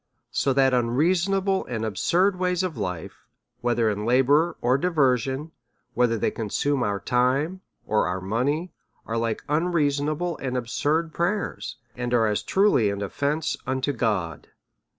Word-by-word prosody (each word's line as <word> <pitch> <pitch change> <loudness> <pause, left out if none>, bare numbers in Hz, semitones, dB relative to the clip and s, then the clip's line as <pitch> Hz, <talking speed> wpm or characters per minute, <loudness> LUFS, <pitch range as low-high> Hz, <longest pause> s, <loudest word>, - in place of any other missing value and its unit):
So 140 - +1
that 135 -1 +3
unreason 160 +11 +2
able 195 0 +1
and 110 -3 -3
absurd 175 - +1
ways 180 0 +1
of 180 -4 -2
life, 90 -6 -5 0.3
whether 120 -1 +1
in 105 -1 -1
labour 140 +8 +3
or 125 +2 +2
di 140 +6 0
version, 135 -1 +1 0.4
whether 120 -2 +2
they - - 0
consume 130 +5 -1
our 100 -3 0
time 135 - +1 0.2
or 110 - +1
our 90 +1 -2
money, 130 - -1 0.3
are 115 - -3
like 115 -1 -1
unreasonable 155 +1 0
and 130 -1 -2
absurd 150 +7 -1
prayers, 170 - -2 0.2
and 125 0 -1
are 115 -2 +4
as 105 -1 0
truly 190 - +3
an 100 0 -3
often 145 +10 -1
ce - - -1
unto 130 +2 0
God. 100 - -2
130 Hz, 150 wpm, -25 LUFS, 115-160 Hz, 0.4 s, are